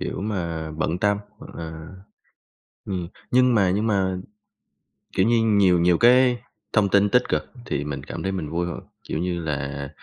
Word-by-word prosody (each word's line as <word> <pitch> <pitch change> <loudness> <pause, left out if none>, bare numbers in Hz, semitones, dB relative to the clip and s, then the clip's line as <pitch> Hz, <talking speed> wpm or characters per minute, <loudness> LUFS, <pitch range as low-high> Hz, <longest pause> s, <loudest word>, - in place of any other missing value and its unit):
kiểu - - -4
mà, 85 -6 -3
bận 80 +2 -2
tâm 100 +1 +2 0.2
hoặc - - -12
là 80 -1 -7 1.0
ừm, 90 -3 -3 0.2
nhưng 125 0 +4
mà 100 -5 +3
nhưng 105 +4 0
mà, 95 -3 +1 1.0
kiểu 95 - +4
như, 120 - +4
nhiều 100 -5 +4
nhiều 85 0 +4
cái 125 0 +5 0.3
thông 105 -3 +3
tin 100 +1 +4
tích 125 +4 +4
cực - - +1 0.2
thì 70 - -2
mình 70 -2 -5
cảm - - -6
thấy 95 - -1
mình 90 -6 -4
vui 85 +2 -1
hơn, 85 - -5 0.2
kiểu - - -4
như 90 0 -1
là 70 -2 -3
90 Hz, 180 wpm, -24 LUFS, 80-105 Hz, 1.0 s, cái